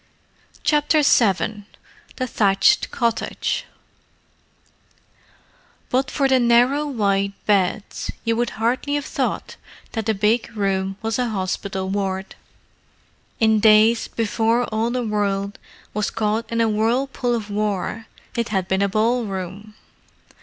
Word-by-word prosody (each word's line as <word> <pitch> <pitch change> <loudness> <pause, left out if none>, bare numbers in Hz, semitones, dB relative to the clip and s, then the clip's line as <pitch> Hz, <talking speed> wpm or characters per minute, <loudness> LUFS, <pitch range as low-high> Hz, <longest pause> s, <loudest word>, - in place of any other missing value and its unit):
CHAPTER 300 0 +3
VII 210 -4 +2 0.5
THE 255 - -2
THATCHED 200 -5 +3
COTTAGE 235 -1 -1 2.3
But 260 +1 +1
for 275 -2 +1
the 265 -1 +4
narrow 245 +5 +3
white 200 -6 0
beds, 200 +1 0 0.2
you 230 0 +1
would 240 +1 0
hardly 250 +6 0
have 290 - -2
thought - - -3 0.3
that 225 -2 -3
the 220 - +2
big 215 +2 0
room 195 -1 -1
was 225 +2 -1
a 245 -1 0
hospital 190 -1 -3
ward. 190 -1 -2 1.1
In 220 -2 +4
days 220 +2 +5
before 230 +1 0
all 220 +2 +1
the 245 0 -2
world 200 -1 -1 0.3
was 210 0 -1
caught 220 +1 -2
into 230 0 +2
a - - +1
whirlpool 240 +3 0
of 215 -3 -5
war 210 +1 -2 0.3
it 235 -1 -1
had 190 -4 -1
been 190 +1 0
a 200 - +2
ballroom. 210 -2 -2
220 Hz, 125 wpm, -22 LUFS, 200-235 Hz, 2.3 s, days